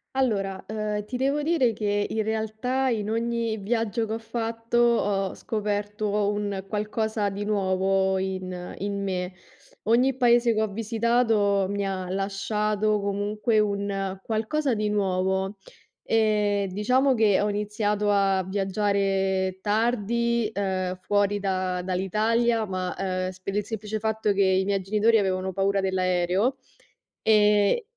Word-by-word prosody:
Allora, 195 -7 0
uhm, 210 -1 -3
ti 250 - -6
devo 275 +3 +1
dire 290 -7 +2
che 205 -1 -1
in 220 -1 -1
realtà 220 +4 -1
in 215 -3 -1
ogni 230 0 -1
viaggio 225 +2 -1
che 215 - -7
ho - - -2
fatto, 230 +1 -3
ho 205 -5 +2
scoperto 210 -1 -2
un 205 -2 -3
qualcosa 215 0 -1
di 200 +1 -5
nuovo 190 -1 +1
in 185 -1 -4
in 200 0 -3
me. 185 -1 -2 0.5
Ogni 245 +4 +3
paese 240 -2 +4
che 215 - 0
ho 220 - +1
visitato 225 -2 +1
mi 200 0 -1
ha 185 -2 -3
lasciato, 210 +2 0
comunque, 205 +3 0
un 200 -2 -1
qualcosa 235 +7 -1
di 210 -1 -1
nuovo. 190 0 0 0.4
Ehm, 210 -2 +2
diciamo 255 +7 +3
che 220 -5 +3
ho 205 - +1
iniziato 210 0 0
a 195 -2 +2
viaggiare 195 -1 0
tardi, 235 +1 +1
uhm, 185 -2 -2
fuori 205 +1 +1
da 185 -2 -1
dall'Italia, 215 +5 +1
ma, 185 -2 -3
ehm, 185 -1 -2
sp 185 0 -17
per 195 - -3
il 210 - +1
semplice 215 0 -4
fatto 220 -1 0
che 200 0 +2
i 190 0 +2
miei 200 -1 0
genitori 215 +4 +3
avevano 190 -1 -1
paura 195 +1 +1
dell' 190 -1 -1
aereo, 185 +7 +1 0.7
e 210 - +4
205 Hz, 135 wpm, -25 LUFS, 195-220 Hz, 0.7 s, paese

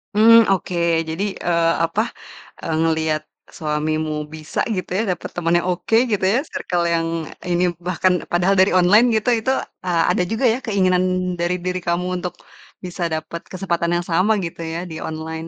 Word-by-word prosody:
Mmm, 230 +1 +7
oke, 185 -1 -1 0.3
jadi, 165 +5 -2
eee, 170 -1 +1
apa, 165 +6 +1 0.6
eee, 165 -2 -1
ngeliat 160 -1 0 0.3
suamimu 155 0 -1 0.2
bisa 155 0 -6 0.2
gitu 185 -2 -4
ya, 215 - +1
dapat - - -8
temen 170 -1 0
yang 175 - -4
oke, 180 +5 -1 0.2
gitu 205 -2 0
ya, 240 - +3
circle 175 -1 -1
yang 165 -1 +1 0.4
ini, 175 0 0 0.2
bahkan 185 +1 +2 0.2
padahal 180 +3 +2
dari 190 +1 +5
online 185 +6 +6
gitu, 220 +3 +1
itu, 240 +4 0 0.3
eee, 175 -3 +1
ada 180 - +1
juga 225 +4 0
ya 230 +2 +2
keinginan 185 -4 +2 0.4
dari 175 +1 0
diri 180 +1 -2
kamu 175 +1 -1 0.2
untuk 180 -1 -3 0.5
bisa 180 -1 -5
dapat 160 +1 -4
kesempatan 170 -3 -1
yang 175 - -5
sama 185 +6 +3
gitu 165 0 -7
ya 165 +1 -4
di - - -6
online. 160 +1 -5
175 Hz, 170 wpm, -20 LUFS, 165-185 Hz, 0.6 s, Mmm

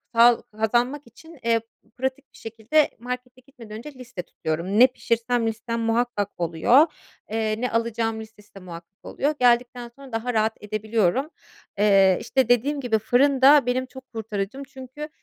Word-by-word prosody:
sağ 235 0 +6 0.2
kazanmak 240 +6 +1
için, 320 +7 -16
eee, 230 -1 +2 0.4
pratik 265 +2 -4
bir - - -17
şekilde 230 +7 0
markete 250 +1 -7
gitmeden 240 -5 -12
önce 285 +6 -10
liste 250 -7 -8
tutuyorum. 170 +8 -3
Ne 255 - +9
pişirsem 235 -1 -1
listem, 230 +1 -3
muhakkak 225 -3 0
oluyor. 175 - +4 0.4
Eee, 220 0 -1
ne 250 - -1
alacağım 230 -1 -1
listesi 215 -2 -16
de 195 - -9
muhakkak 175 +1 -12
oluyor. 295 +2 -1
Geldikten 245 0 +2
sonra 275 -2 -13
daha 230 +2 -2
rahat 220 0 +1
edebiliyorum. 215 - 0 0.5
Eee, 195 -2 +5
işte, 260 -3 0
dediğim 275 +5 +2
gibi 235 -5 0
fırın 265 +5 +2
da 280 0 +7
benim 255 +1 0
çok 260 0 -14
kurtarıcım. 220 +3 -4
Çünkü, 275 +2 -9
235 Hz, 155 wpm, -24 LUFS, 220-260 Hz, 0.5 s, Ne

